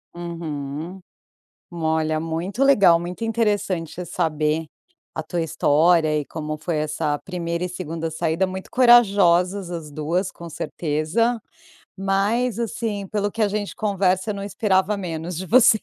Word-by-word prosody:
Uhum. 165 0 -5 0.7
Olha, 160 -2 0
muito 170 +9 -2
legal, 200 -11 +6
muito 180 +5 -6
interessante 205 -7 -1
saber 155 -2 -1 0.5
a 160 - -3
tua 175 +2 -2
história 155 0 +3
e 145 - -5
como 155 0 -5
foi 160 +2 -3
essa 150 0 -1
1ª 170 -1 -4
e 180 - -2
2ª 165 -2 -4
saída, 165 +3 0
muito 185 0 -7
corajosas 200 -7 +4
as 165 -3 -5
2, 165 +6 -1
com 170 - -10
certeza, 165 +11 -1 0.6
mas 205 +5 0
assim 220 -3 -3
pelo 205 0 -1
que 225 - -4
a 215 - +4
gente 205 0 -3
conversa 195 -1 +1
não 200 0 -5
esperava 200 0 +1
menos 170 -2 -4
de 190 - -4
você. 225 0 +6
180 Hz, 135 wpm, -23 LUFS, 160-200 Hz, 0.7 s, legal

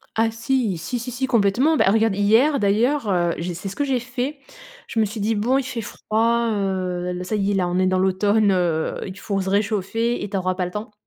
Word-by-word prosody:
Ah 225 0 +2
si, 225 -3 -1
si, 180 +9 -4
si, 250 - -5
si 255 +2 -2
complètement. 245 +5 +2
Bah, - - +3
regarde, 220 -1 +2
hier 230 +8 +3
d'ailleurs, 220 +5 +1
heu, 175 -2 +1
j'ai 175 0 -4
c'est 185 +3 -6
ce 195 - -6
que 285 - 0
j'ai 265 -3 0
fait. 255 +4 -4 0.5
Je 225 - -3
me 215 - +4
suis 215 +2 -6
dit: 215 +2 +1
«Bon, 235 +6 +1
il 275 - 0
fait 250 -3 -4
froid, 230 +2 0
heu, 185 -3 -2
l 180 0 -4
ça 215 - -2
y 200 -1 0
est, - - +1
là, 180 -2 +1
on 180 +1 0
est 185 - +3
dans 185 - +2
l'automne, 200 +3 +2
heu, 175 -4 0
il 190 0 -8
faut 200 -1 -2
se 190 - -3
réchauffer 215 +3 0
et 205 - -5
tu 195 - -2
auras 185 0 0
pas 180 -1 -1
le 180 - -6
temps» 210 +3 -6
210 Hz, 250 wpm, -22 LUFS, 185-235 Hz, 0.5 s, me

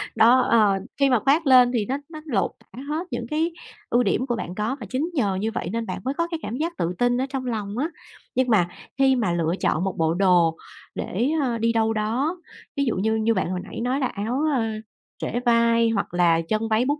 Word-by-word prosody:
Đó, 240 +3 +6
ờ, 210 -5 +3 0.2
khi 275 -1 +4
mà 250 -3 +3
khoác 280 +7 +2
lên 250 -2 +7
thì 225 -4 0
nó 265 +6 -2
nó 310 -2 -9
lột 235 -11 0
tả - - -14
hết 320 +4 -2
những 235 - -3
cái 320 +3 +1 0.4
ưu 245 +1 +3
điểm 235 +4 0
của 240 - 0
bạn 180 -5 -5
có 215 +6 -1
và 225 - -7
chính 285 - -1
nhờ 210 - +1
như 215 +4 -1
vậy 195 - -4
nên 230 0 -2
bạn - - -4
mới 265 +2 -1
có 335 +3 -1
cái 330 - -2
cảm 235 - -4
giác 335 +3 -3
tự 170 -5 -1
tin 245 +2 +2
ở - - 0
trong 265 -1 -4
lòng 215 -3 -3
á. 295 +6 0 0.5
Nhưng 255 0 +2
mà 200 -7 +4 0.3
khi 270 -1 +4
mà 220 -8 0
lựa 165 -1 0
chọn 155 - +1
một 190 -1 -2
bộ 160 0 +2
đồ 175 -3 +3 0.4
để, 235 +9 -1
ờ, 245 -4 0
đi 230 +1 +1
đâu 225 -1 +2
đó, 235 +11 -1 0.4
ví 280 - +2
dụ 235 - 0
như 220 +4 +1
như 220 +1 +2
bạn 185 -3 -1
hồi 185 - -2
nãy - - -7
nói 250 +3 0
là 260 - +1
áo, 235 +8 -2
ơ, 240 - +1 0.5
trễ 240 - -2
vai 230 -1 +4
hoặc 215 -5 -2
là 170 -2 +3
chân 220 +1 0
váy 220 +3 +2
bút 290 +3 0
230 Hz, 245 wpm, -24 LUFS, 205-265 Hz, 0.5 s, lên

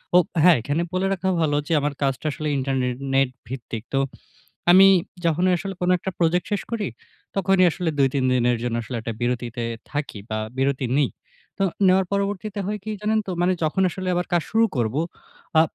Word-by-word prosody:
ও - - +10 0.2
হ্যাঁ 175 +1 +7
এখানে 145 +8 -1
বলে 185 +1 +1
রাখা 190 0 -1
ভালো 150 -2 +2
যে, - - 0
আমার 145 0 -1
কাজটা 135 +1 -1
আসলে 155 +1 -4
ইন্টারনে-নেট 135 0 0 0.2
ভিত্তিক 120 -3 -6
তো, 135 - +3 0.7
আমি 190 +2 +9 0.4
যখনই 175 +3 +2
আসলে 195 +2 -5
কোন 180 0 +1
একটা 190 - -4
প্রজেক্ট 175 +1 +2
শেষ 205 - 0
করি, 225 -4 -1 0.5
তখনই 195 -1 +4
আসলে 175 +1 -3
২ 135 -1 +5
৩ 135 -2 +1
দিনের 125 -1 +2
জন্য 120 -1 -1
আসলে 120 +2 -5
একটা 115 +1 -4
বিরতিতে 120 -1 -2 0.3
থাকি 145 -7 -4
বা 110 - -1 0.2
বিরতি 135 0 0
নিই। 145 -3 +2 0.5
তো - - 0 0.2
নেওয়ার 185 0 +4
পরবর্তীতে 200 +1 -2
হয় 210 +1 -2
কী 215 - -4
জানেন 215 +1 +1
তো? - - -4
মানে 180 +1 +3
যখন 155 +5 +1
আসলে 185 +1 -5
আবার 175 0 -1
কাজ 175 -1 +3
শুরু 225 +1 +4
করবো, 120 +4 0 0.6
আ - - +9
155 Hz, 185 wpm, -23 LUFS, 130-190 Hz, 0.7 s, ও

